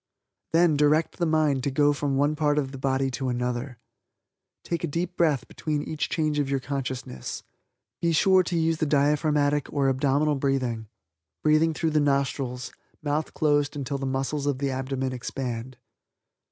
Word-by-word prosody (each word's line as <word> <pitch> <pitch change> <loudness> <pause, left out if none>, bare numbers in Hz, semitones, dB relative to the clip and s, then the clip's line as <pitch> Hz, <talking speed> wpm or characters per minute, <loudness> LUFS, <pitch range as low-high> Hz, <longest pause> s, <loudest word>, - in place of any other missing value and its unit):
Then 165 -2 +4
direct 150 +2 +2
the 170 - +2
mind 155 -4 +2
to 140 - +1
go 145 +2 +3
from 145 -1 -1
one 145 +2 +2
part 150 -1 +1
of 135 -3 0
the 135 - -8
body 135 0 0
to 130 +1 -2
another. 125 +1 -2 0.9
Take 170 0 -3
a - - +1
deep 170 +4 -3
breath 155 -7 +1
between 150 -2 -3
each 155 -1 -3
change 155 -2 0
of 140 -2 0
your 135 -1 +1
consciousness. 130 - -5 0.6
Be 170 - +2
sure 185 +4 +5
to 175 -1 -2
use 165 0 +1
the 155 - 0
diaphragmatic 145 0 +2
or 140 -2 +2
abdominal 140 +3 +2
breathing 130 -5 -1 0.6
breathing 155 +1 +3
through 160 0 0
the 155 - +3
nostrils, 140 -3 0 0.3
mouth 150 +1 -1
closed 145 -1 +2
until 140 0 -3
the 135 - -2
muscles 135 +2 -1
of 140 -2 +1
the 140 0 -1
abdomen 130 0 -2
expand. 125 -1 -5
145 Hz, 165 wpm, -26 LUFS, 135-155 Hz, 0.9 s, sure